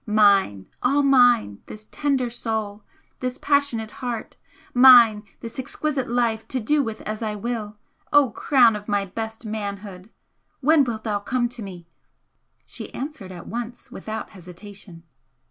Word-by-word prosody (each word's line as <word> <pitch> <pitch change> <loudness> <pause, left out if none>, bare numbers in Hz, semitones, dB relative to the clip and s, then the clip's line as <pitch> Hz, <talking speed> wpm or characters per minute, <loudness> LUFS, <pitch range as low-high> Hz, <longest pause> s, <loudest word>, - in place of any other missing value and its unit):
Mine 200 - +3 0.2
all 280 +3 +2
mine 245 - +4
this 215 0 -10
tender 270 -4 0
soul, 220 -3 -3 0.4
this 255 0 -3
passionate 280 -7 0
heart! 245 -3 -5 0.4
mine 245 -4 +8 0.2
this 230 +2 -7
exquisite 270 0 -3
life 235 -2 0
to 260 - -2
do 290 +6 +2
with 225 -5 -5
as 215 +1 -5
I 215 -2 -2
will! 215 -1 -4 0.3
O 290 -5 +5
crown 240 -1 +4
of 210 0 -8
my 205 -1 0
best 220 +3 -6
manhood! 200 -2 -6 0.5
when 295 +2 +4
wilt 225 -4 -4
thou 210 -2 -1
come 240 +3 -1
to 240 -1 -9
me?" 180 -4 -9 0.8
She - - -8
answered 265 -10 -6
at 175 -2 -9
once 240 +2 -7
without 220 0 -6
hesitation. 180 -1 -11
225 Hz, 145 wpm, -23 LUFS, 205-250 Hz, 0.8 s, mine